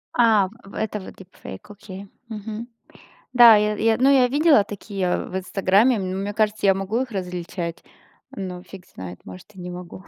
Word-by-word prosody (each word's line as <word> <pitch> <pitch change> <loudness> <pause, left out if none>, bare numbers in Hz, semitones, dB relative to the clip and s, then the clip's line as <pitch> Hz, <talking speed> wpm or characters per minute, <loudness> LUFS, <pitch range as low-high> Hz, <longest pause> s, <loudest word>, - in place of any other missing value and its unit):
А, 220 -5 +4 0.2
в 195 - -14
это 215 -1 -3
вот 190 - -11
дипфейк, 185 - -12
окей, 200 -1 -10 0.2
мгм. 220 +1 -6 0.7
Да, 240 -3 +9
я 210 0 +1
я 225 +1 +2
ну, 265 +2 +4
я 260 -3 +5
видела 290 -4 +4
такие 195 -3 -3
в 185 - -6
"Инстаграме". 195 +5 +2
Мне 195 +2 -3
кажется, 215 -1 0
я 195 - +5
могу 195 +6 -1
их 260 - -7
различать, 180 -3 -5 0.5
но 180 -2 -6
фиг 190 -1 -13
знает, 90 -1 -10
может 95 - -12
и 185 - -12
не 180 - -6
могу. 180 +1 -9
200 Hz, 175 wpm, -23 LUFS, 185-220 Hz, 0.7 s, Да